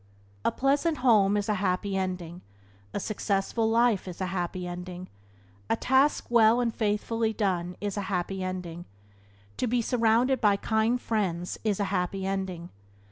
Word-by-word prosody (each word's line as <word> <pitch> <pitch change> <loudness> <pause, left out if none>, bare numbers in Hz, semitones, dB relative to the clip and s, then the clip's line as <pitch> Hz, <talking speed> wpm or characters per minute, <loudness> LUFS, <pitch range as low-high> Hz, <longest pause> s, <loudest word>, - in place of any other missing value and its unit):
A - - +2
pleasant 290 +4 +1
home 210 -4 +5
is 205 - -1
a 215 - +2
happy 195 +1 0
ending; 180 -2 -3 0.5
a - - -3
successful 215 +2 -1
life 230 -4 +2
is 180 - -7
a 190 - -1
happy 180 0 -3
ending; 180 +1 -7 0.6
a - - +3
task 265 +5 +2
well 230 0 +5
and 235 -2 0
faithfully 220 +1 0
done 180 -4 -1
is 205 -1 -3
a - - 0
happy 190 0 -2
ending; 180 -2 -5 0.7
to 250 - 0
be 245 +1 +1
surrounded 235 +2 +2
by 205 -3 +4
kind 220 +4 +1
friends 185 -7 -2
is 210 -3 0
a - - +2
happy 190 +1 -1
ending. 190 -3 -3
200 Hz, 155 wpm, -28 LUFS, 185-225 Hz, 0.7 s, home